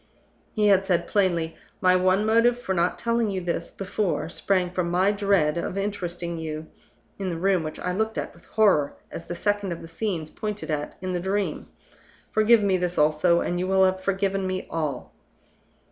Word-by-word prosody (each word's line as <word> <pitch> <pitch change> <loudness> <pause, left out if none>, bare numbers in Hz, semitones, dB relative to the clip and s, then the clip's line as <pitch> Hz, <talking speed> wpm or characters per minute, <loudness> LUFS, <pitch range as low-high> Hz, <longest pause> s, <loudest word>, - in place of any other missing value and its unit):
He 210 -2 +2
had 195 -1 +5
said 175 -3 +1
plainly, 170 -5 +1 0.2
"My 185 -1 +4
one 185 +3 +3
motive 230 +2 +3
for 190 -6 -2
not 175 0 +1
telling 230 -1 0
you 190 -2 -2
this 175 -1 -3
before 195 -3 -2
sprang 180 0 0
from 180 -1 -1
my 185 +3 +3
dread 195 -6 +2
of 185 - -4
interesting 175 -4 -3
you 155 -1 -5 0.5
in 195 -1 -2
the 170 - -3
room 190 +1 +2
which 155 -1 -5
I 180 - -2
looked 220 +3 -1
at - - -3
with - - -20
horror 190 -10 +2 0.2
as 165 - -8
the 175 - -4
second 205 0 -1
of 165 - -9
the - - -8
scenes 165 -3 -3
pointed 210 -5 -4
at 150 -1 -3
in 185 0 -2
the 180 - 0
Dream. 195 +3 -2 0.6
Forgive 215 0 +5
me 195 -2 +3
this 180 -1 -2
also, 155 +3 +3
and 175 - -1
you 185 - -1
will 190 0 +4
have 185 0 0
forgiven 195 0 0
me 185 0 -3
all." 155 -3 -3
185 Hz, 190 wpm, -25 LUFS, 170-200 Hz, 0.6 s, had